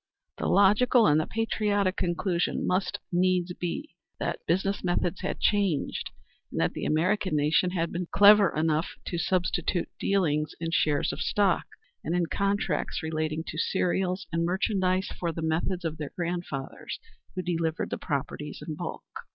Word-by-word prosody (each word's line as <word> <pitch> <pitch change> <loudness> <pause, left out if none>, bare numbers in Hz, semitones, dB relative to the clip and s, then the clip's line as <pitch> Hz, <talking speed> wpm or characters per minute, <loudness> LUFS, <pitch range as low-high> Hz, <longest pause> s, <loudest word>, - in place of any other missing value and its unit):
The - - -1
logical 215 +4 +5
and 150 -3 +5
the - - -4
patriotic 205 -4 0
conclusion 175 0 0
must 185 0 0
needs 180 0 +2
be 180 - -4 0.2
that - - -3
business 190 +3 0
methods 175 0 0
had 185 - -3
changed, 200 -7 +1 0.4
and - - -4
that - - +1
the - - -4
American 180 +3 +1
nation 150 +5 +3
had 170 -2 -1
been 175 0 -3
clever 205 -1 +7
enough 155 +1 0
to 175 - -3
substitute 180 0 0
dealings 155 -6 +1
in 165 0 -3
shares 150 -3 +1
of - - -6
stock, 200 -4 +2 0.4
and 165 - -1
in 175 -1 +2
contracts 200 -4 -1
relating 155 0 -2
to 155 - -5
cereals 185 +1 0
and 165 0 0
merchandise 185 +1 +1
for 170 -2 -1
the 165 0 -5
methods 170 +3 -1
of 160 -1 -2
their 150 -2 -4
grandfathers 170 -6 -4 0.4
who 185 - -2
delivered 165 -2 -1
the - - -2
properties 150 0 -4
in 155 - -3
bulk. - - -6
175 Hz, 155 wpm, -28 LUFS, 160-190 Hz, 0.4 s, clever